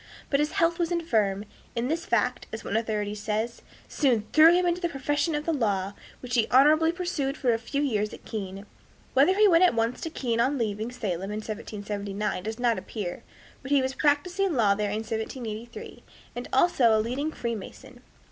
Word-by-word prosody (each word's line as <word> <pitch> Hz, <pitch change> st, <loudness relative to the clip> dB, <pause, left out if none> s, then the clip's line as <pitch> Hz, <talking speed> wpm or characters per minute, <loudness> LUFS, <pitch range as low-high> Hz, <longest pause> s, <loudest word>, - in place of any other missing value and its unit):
But 280 Hz, -, +3 dB
his 300 Hz, +1 st, 0 dB
health 335 Hz, +1 st, +2 dB
was 340 Hz, 0 st, 0 dB
infirm, 215 Hz, -, 0 dB, 0.3 s
and 235 Hz, +1 st, -1 dB
this 325 Hz, +4 st, -2 dB
fact, 245 Hz, +2 st, 0 dB
as 220 Hz, -, -6 dB
one 200 Hz, -, -3 dB
authority 215 Hz, -2 st, -1 dB
says, 215 Hz, +3 st, -3 dB, 0.3 s
"soon 245 Hz, -7 st, +1 dB
threw 315 Hz, +1 st, +8 dB
him 360 Hz, +1 st, +3 dB
into 350 Hz, 0 st, 0 dB
the 345 Hz, -, 0 dB
profession 290 Hz, +2 st, -1 dB
of 295 Hz, 0 st, -3 dB
the 330 Hz, -, +1 dB
law, 200 Hz, -7 st, 0 dB, 0.3 s
which 250 Hz, -1 st, -7 dB
he 230 Hz, -3 st, +3 dB
honorably 310 Hz, +5 st, +5 dB
pursued 335 Hz, -6 st, -2 dB
for 245 Hz, -3 st, +2 dB
a 225 Hz, -, -1 dB
few 280 Hz, +5 st, -2 dB
years 215 Hz, -6 st, 0 dB
at -, -, -12 dB
Keene." 195 Hz, -2 st, -6 dB, 0.5 s
Whether 290 Hz, +8 st, +5 dB
he 420 Hz, +1 st, +6 dB
went 345 Hz, -2 st, +5 dB
at 360 Hz, -, +4 dB
once 230 Hz, +2 st, 0 dB
to 325 Hz, -, -3 dB
Keene 240 Hz, -7 st, -2 dB
on 265 Hz, +4 st, +2 dB
leaving 220 Hz, 0 st, -2 dB
Salem 195 Hz, -6 st, -3 dB
in 210 Hz, -, -3 dB
1779 205 Hz, -2 st, -4 dB
does 220 Hz, +3 st, -5 dB
not 240 Hz, -2 st, +1 dB
appear, 190 Hz, -6 st, -5 dB, 0.4 s
but 265 Hz, -, -8 dB
he 280 Hz, -2 st, +4 dB
was 260 Hz, 0 st, -1 dB
practicing 350 Hz, +7 st, +1 dB
law 210 Hz, -5 st, +4 dB
there 205 Hz, 0 st, -1 dB
in 215 Hz, +2 st, -2 dB
1783, 225 Hz, +1 st, -6 dB, 0.3 s
and 245 Hz, -, -5 dB
was -, -, -22 dB
also 260 Hz, -6 st, +4 dB
a -, -, +2 dB
leading 255 Hz, +8 st, -2 dB
Freemason. 235 Hz, 0 st, -6 dB
240 Hz, 195 wpm, -27 LUFS, 215-295 Hz, 0.5 s, threw